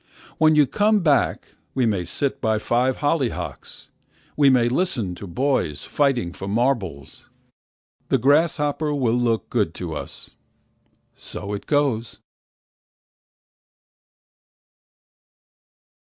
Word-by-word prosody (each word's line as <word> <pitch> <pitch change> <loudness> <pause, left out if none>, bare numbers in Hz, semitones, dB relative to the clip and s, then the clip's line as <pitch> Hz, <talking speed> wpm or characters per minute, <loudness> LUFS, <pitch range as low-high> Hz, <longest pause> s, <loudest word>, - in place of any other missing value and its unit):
When 155 0 +5
you 150 -1 +6
come 210 +7 +2
back 150 -5 +1 0.3
we 130 -2 +2
may 100 -6 0
sit 135 - -1
by 110 -2 +1
five 125 +5 0
hollyhocks. 145 -5 -2 0.4
We 145 -2 +5
might 120 -2 +3
listen 125 - 0
to 100 +3 -9
boys 105 - -1
fighting 125 -12 0
for 95 - -7
marbles. 100 - -2 0.8
The - - +3
grasshopper 150 +2 +2
will 125 -5 +1
look 120 -2 0
good 105 -9 0
to 85 -4 -5
us. - - -7 0.8
So 100 0 -7
it 100 - -6
goes. 135 -6 0
125 Hz, 105 wpm, -23 LUFS, 105-145 Hz, 0.8 s, you